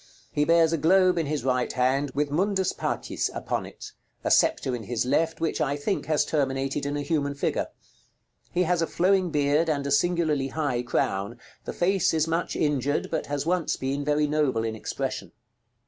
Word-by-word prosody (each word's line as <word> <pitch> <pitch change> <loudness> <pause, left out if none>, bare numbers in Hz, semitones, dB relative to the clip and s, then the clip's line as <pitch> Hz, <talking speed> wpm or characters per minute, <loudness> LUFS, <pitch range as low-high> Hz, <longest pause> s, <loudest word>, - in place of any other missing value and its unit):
He 150 - +1
bears 165 0 +4
a 165 - 0
globe 185 +2 +4
in 160 - -1
his 150 0 -2
right 125 -1 0
hand, 135 +3 +1
with 145 0 0
"MUNDUS 190 +4 +1
PACIS" - - -2
upon - - -3
it; - - -11 0.3
a - - 0
sceptre 130 - +3
in 115 -3 -7
his 120 +2 -1
left, 160 +5 +1
which 165 - -1
I 145 0 0
think 170 +8 -2
has 150 -2 +2
terminated 135 -1 -1
in 145 +1 -2
a 145 - -2
human 140 -2 -1
figure. 140 - -1 0.8
He 180 - +2
has 175 0 +1
a 165 - +1
flowing 185 0 +2
beard, 150 +2 +2
and 140 -2 0
a 140 - -2
singularly 155 -2 +2
high 135 -4 -1
crown; 100 -5 -1 0.3
the - - -4
face 180 -2 +2
is 160 0 +1
much 165 +1 -1
injured, 145 -1 0
but 160 - -2
has 145 0 -2
once 175 -1 0
been 135 +2 -2
very 150 +1 +2
noble 145 -6 +1
in 110 -1 -2
expression. 135 +4 -4
145 Hz, 190 wpm, -26 LUFS, 135-165 Hz, 0.8 s, bears